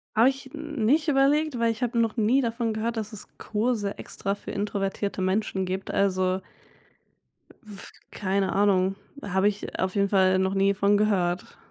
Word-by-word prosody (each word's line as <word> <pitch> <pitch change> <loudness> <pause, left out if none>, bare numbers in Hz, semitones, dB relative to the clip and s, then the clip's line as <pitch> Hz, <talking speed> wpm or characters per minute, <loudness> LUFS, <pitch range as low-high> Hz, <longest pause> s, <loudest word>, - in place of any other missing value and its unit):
Habe 230 +4 +6
ich 270 0 -6
nicht 305 -1 0
überlegt, 285 0 +2
weil 230 0 +3
ich 225 +2 -4
habe 235 -1 0
noch 230 +1 +1
nie 230 +5 +3
davon 230 -2 -1
gehört, 225 +2 -2
dass 215 0 -4
es 210 - -5
Kurse 215 -2 -1
extra 195 - -3
für 205 - -8
introvertierte 200 -1 -2
Menschen 190 0 0
gibt. 190 +1 -4
Also 185 -1 +1 1.2
w 210 -3 -7 0.3
keine 195 -1 0
Ahnung, 195 -1 +3 0.3
habe 190 0 +1
ich 205 0 -3
auf 185 +1 -1
jeden 200 -1 +2
Fall 190 -1 +4
noch 190 0 +1
nie 195 0 +3
von 200 +1 +3
gehört. 185 -4 0
205 Hz, 165 wpm, -26 LUFS, 195-230 Hz, 1.2 s, Habe